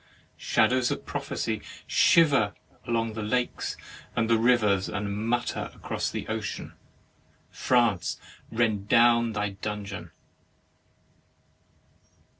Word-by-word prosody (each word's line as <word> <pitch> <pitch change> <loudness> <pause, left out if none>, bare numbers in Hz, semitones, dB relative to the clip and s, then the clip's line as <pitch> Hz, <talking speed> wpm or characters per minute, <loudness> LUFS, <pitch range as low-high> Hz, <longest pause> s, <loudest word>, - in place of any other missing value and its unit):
Shadows 125 +3 +2
of - - -4
prophecy - - -3 0.2
shiver 140 -11 +4 0.3
along 115 -1 0
by 110 0 -5
the 105 - -4
lakes 125 +2 -1 0.4
and 115 -1 +1
the 115 -1 +3
rivers, 110 -5 +3
and 100 -1 -3
mutter 120 +1 -1
across - - -3
the - - -5
ocean. - - -4 0.8
France, 120 -7 +1 0.3
rend 110 -3 0
down 115 -1 +5
thy 105 -1 -1
dungeon! 100 0 -6
115 Hz, 100 wpm, -27 LUFS, 105-120 Hz, 0.8 s, down